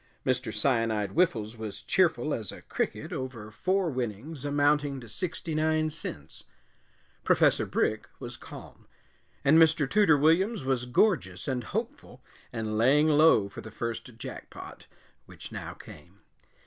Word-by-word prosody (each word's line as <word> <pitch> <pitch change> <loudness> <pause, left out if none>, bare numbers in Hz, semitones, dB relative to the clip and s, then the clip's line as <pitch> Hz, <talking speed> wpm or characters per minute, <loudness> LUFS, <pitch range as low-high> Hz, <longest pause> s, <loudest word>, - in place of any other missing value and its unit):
Mr. 130 0 0
Cyanide 115 -7 +1
Whiffles 120 -10 +1
was 110 -2 -7
cheerful 165 -4 +2
as 110 -5 -3
a - - -12
cricket - - -3
over 120 -5 -6
four 185 - 0
winnings 130 +4 -5
amounting 145 -1 +1
to 120 - -11
sixty 160 - -4
nine 155 0 +1
cents; 80 - -8 0.8
Professor - - +3
Brick - - 0
was - - -7
calm, - - -12 0.6
and 155 +4 +6
Mr. 160 -3 +4
Tooter 190 -4 +4
Williams 165 - +2
was 130 -2 0
gorgeous 120 - +1
and 125 -3 -2
hopeful, 220 - -5 0.3
and 110 -2 -3
laying 145 +6 +4
low 150 -9 +5
for 100 - -9
the 110 - -9
first 115 +1 -5
jackpot, - - -9 0.4
which - - -11
now - - -6
came. 85 +7 -14
135 Hz, 135 wpm, -28 LUFS, 115-160 Hz, 0.8 s, and